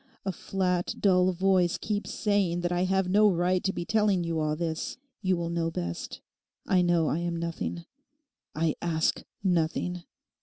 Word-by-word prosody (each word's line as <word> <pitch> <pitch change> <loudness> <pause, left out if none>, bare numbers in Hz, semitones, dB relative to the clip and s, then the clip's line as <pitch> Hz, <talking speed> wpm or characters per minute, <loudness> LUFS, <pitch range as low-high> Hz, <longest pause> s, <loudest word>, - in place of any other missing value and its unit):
A 195 - 0
flat, 180 0 -1
dull 185 -2 +4
voice 185 -1 +2
keeps 210 -1 -3
saying 200 -5 +1
that 175 0 -1
I 175 +1 +1
have 190 0 +1
no 210 +3 +5
right 180 0 +1
to 195 - +1
be 175 - -4
telling 210 -4 +2
you 165 -1 -1
all 155 0 0
this. 160 0 -3 0.2
You 185 -2 +1
will 170 0 -3
know 170 -1 0
best. 85 - -5 0.4
I 185 -1 +3
know 175 -2 +3
I 155 - 0
am 170 0 -2
nothing. 170 0 -4 0.7
I 160 0 +1
ask 160 -2 0 0.2
nothing. 180 0 0
175 Hz, 165 wpm, -28 LUFS, 170-190 Hz, 0.7 s, no